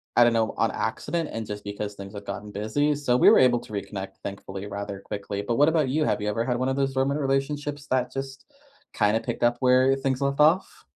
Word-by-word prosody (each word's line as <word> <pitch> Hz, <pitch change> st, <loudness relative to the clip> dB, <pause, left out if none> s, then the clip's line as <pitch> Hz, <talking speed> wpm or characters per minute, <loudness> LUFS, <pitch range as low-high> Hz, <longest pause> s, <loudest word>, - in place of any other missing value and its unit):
I 120 Hz, -, +7 dB
don't 120 Hz, -, +4 dB
know, 110 Hz, -1 st, +1 dB
on 115 Hz, -, +2 dB
accident 160 Hz, +8 st, -2 dB
and 115 Hz, -1 st, -4 dB
just 105 Hz, 0 st, -6 dB
because 100 Hz, 0 st, -5 dB
things 100 Hz, 0 st, -9 dB
have 100 Hz, -1 st, -8 dB
gotten 100 Hz, +1 st, -6 dB
busy. 110 Hz, +9 st, 0 dB
So, 140 Hz, -4 st, +1 dB
we -, -, +7 dB
were -, -, +6 dB
able 125 Hz, -2 st, +5 dB
to 110 Hz, -, -12 dB
reconnect, 100 Hz, -1 st, -5 dB
thankfully, 100 Hz, 0 st, -6 dB
rather 100 Hz, -1 st, -5 dB
quickly. 100 Hz, 0 st, -5 dB
But 115 Hz, +3 st, -1 dB
what 145 Hz, +5 st, +5 dB
about 155 Hz, -4 st, +1 dB
you? 155 Hz, +4 st, +1 dB
Have -, -, 0 dB
you 105 Hz, -, -1 dB
ever 115 Hz, +2 st, -1 dB
had 125 Hz, -1 st, 0 dB
one 130 Hz, +1 st, 0 dB
of 130 Hz, -, 0 dB
those 135 Hz, -1 st, 0 dB
dormant 135 Hz, +2 st, 0 dB
relationships 145 Hz, +1 st, -2 dB
that 125 Hz, -1 st, +1 dB
just 135 Hz, 0 st, -6 dB, 0.5 s
kinda 105 Hz, +1 st, +2 dB
picked 120 Hz, 0 st, -4 dB
up 120 Hz, 0 st, +3 dB
where 130 Hz, +1 st, +4 dB
things 135 Hz, -1 st, -2 dB
left 140 Hz, 0 st, 0 dB
off? 160 Hz, +5 st, +2 dB
120 Hz, 235 wpm, -25 LUFS, 105-135 Hz, 0.5 s, I